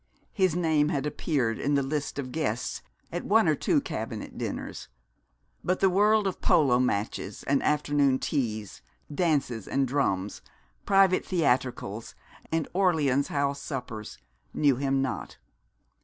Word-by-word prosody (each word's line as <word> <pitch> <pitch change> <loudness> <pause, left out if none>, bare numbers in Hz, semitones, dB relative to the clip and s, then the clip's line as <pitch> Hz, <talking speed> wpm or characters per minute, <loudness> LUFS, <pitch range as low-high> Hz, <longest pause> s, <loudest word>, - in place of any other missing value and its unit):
His 185 -5 +2
name 160 -4 +2
had 140 -2 -1
appeared 135 -6 -1
in 145 +1 +1
the 140 - +2
list 145 +1 -3
of 130 -3 -4
guests 130 -7 -2 0.3
at - - -3
one - - +4
or - - +4
two - - +2
cabinet - - -5
dinners; - - -5 0.8
but 185 +1 0
the 195 - +4
world 210 +2 +4
of 190 - -2
polo 145 -9 +4
matches 105 -4 -2
and 140 0 +1
afternoon 145 -2 +2
teas, 110 -9 -3 0.3
dances 145 - 0
and 135 0 +1
drums, 105 -8 -1 0.5
private 195 -2 +4
theatricals, 125 - -1 0.4
and 160 -2 0
Orleans 155 -8 +2
House 140 -1 -1
suppers, 120 -7 -6 0.4
knew 140 -4 +3
him 135 0 +1
not. 130 - -4
140 Hz, 135 wpm, -27 LUFS, 125-160 Hz, 0.8 s, one